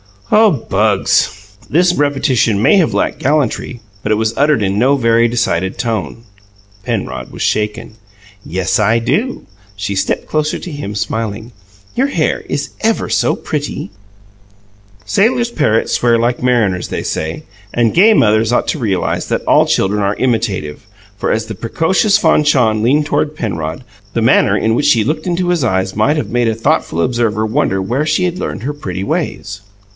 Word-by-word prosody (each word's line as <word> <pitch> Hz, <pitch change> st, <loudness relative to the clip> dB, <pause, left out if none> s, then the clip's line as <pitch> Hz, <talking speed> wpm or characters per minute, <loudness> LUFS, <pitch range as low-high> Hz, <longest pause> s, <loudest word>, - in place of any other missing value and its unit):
"Oh, 215 Hz, +1 st, +6 dB
Bugs!" 100 Hz, -, 0 dB
This 175 Hz, +4 st, +3 dB
repetition 135 Hz, -, +1 dB
may 200 Hz, -, +5 dB
have 175 Hz, -5 st, +2 dB
lacked -, -, -1 dB
gallantry, 135 Hz, -4 st, -1 dB, 0.2 s
but 105 Hz, -, -2 dB
it -, -, +1 dB
was 110 Hz, +1 st, -1 dB
uttered 145 Hz, -5 st, +2 dB
in 100 Hz, +1 st, 0 dB
no 135 Hz, +4 st, +3 dB
very 115 Hz, -2 st, +3 dB
decided 95 Hz, -6 st, -1 dB
tone. 115 Hz, -3 st, -3 dB, 0.6 s
Penrod 105 Hz, -, -4 dB
was -, -, -9 dB
shaken. 105 Hz, 0 st, -2 dB, 0.5 s
"Yes, 95 Hz, +5 st, -1 dB
I 110 Hz, +2 st, +3 dB
do!" 220 Hz, -, -1 dB, 0.3 s
She 100 Hz, 0 st, -3 dB
stepped 95 Hz, -, -1 dB
closer 155 Hz, 0 st, -1 dB
to 180 Hz, -, -8 dB
him, 145 Hz, -9 st, -6 dB
smiling. 110 Hz, +2 st, -3 dB, 0.4 s
"Your 265 Hz, +3 st, +2 dB
hair 280 Hz, -, -1 dB
is -, -, -2 dB
ever 225 Hz, 0 st, 0 dB
so -, -, +1 dB
pretty." 145 Hz, -8 st, -4 dB, 1.1 s
Sailors' 235 Hz, +3 st, +1 dB
parrots 125 Hz, -, +1 dB
swear 120 Hz, -1 st, +3 dB
like 120 Hz, +1 st, 0 dB
mariners, 110 Hz, -8 st, +1 dB
they -, -, -4 dB
say; 80 Hz, +1 st, -3 dB, 0.3 s
and 120 Hz, -2 st, +1 dB
gay 210 Hz, +6 st, +6 dB
mothers 110 Hz, -, +3 dB
ought -, -, +1 dB
to 155 Hz, -, -1 dB
realize 100 Hz, -7 st, -1 dB
that -, -, -1 dB
all -, -, +4 dB
children 105 Hz, +2 st, +1 dB
are 100 Hz, +1 st, 0 dB
imitative, 105 Hz, -, -2 dB, 0.3 s
for, -, -, -2 dB
as 110 Hz, 0 st, 0 dB
the 110 Hz, -, -6 dB
precocious 185 Hz, -, +1 dB
Fanchon 135 Hz, -, +2 dB
leaned 145 Hz, +6 st, +2 dB
toward 150 Hz, +1 st, -1 dB
Penrod, 85 Hz, -, -4 dB, 0.3 s
the 115 Hz, -, 0 dB
manner 105 Hz, -2 st, +4 dB
in 110 Hz, -, +1 dB
which 145 Hz, -, +1 dB
she 115 Hz, -3 st, +4 dB
looked 155 Hz, -, -2 dB
into 175 Hz, 0 st, 0 dB
his 175 Hz, -5 st, +1 dB
eyes 95 Hz, -4 st, 0 dB
might 125 Hz, +9 st, +2 dB
have 150 Hz, -, -3 dB
made 120 Hz, -1 st, +1 dB
a 110 Hz, -, 0 dB
thoughtful 95 Hz, -6 st, 0 dB
observer 115 Hz, -1 st, 0 dB
wonder 110 Hz, -4 st, 0 dB
where 125 Hz, +10 st, -1 dB
she 155 Hz, +4 st, +1 dB
had 180 Hz, 0 st, -1 dB
learned -, -, -4 dB
her 145 Hz, +3 st, -2 dB
pretty 95 Hz, -10 st, -5 dB
ways. 100 Hz, 0 st, -3 dB
115 Hz, 170 wpm, -15 LUFS, 105-150 Hz, 1.1 s, Oh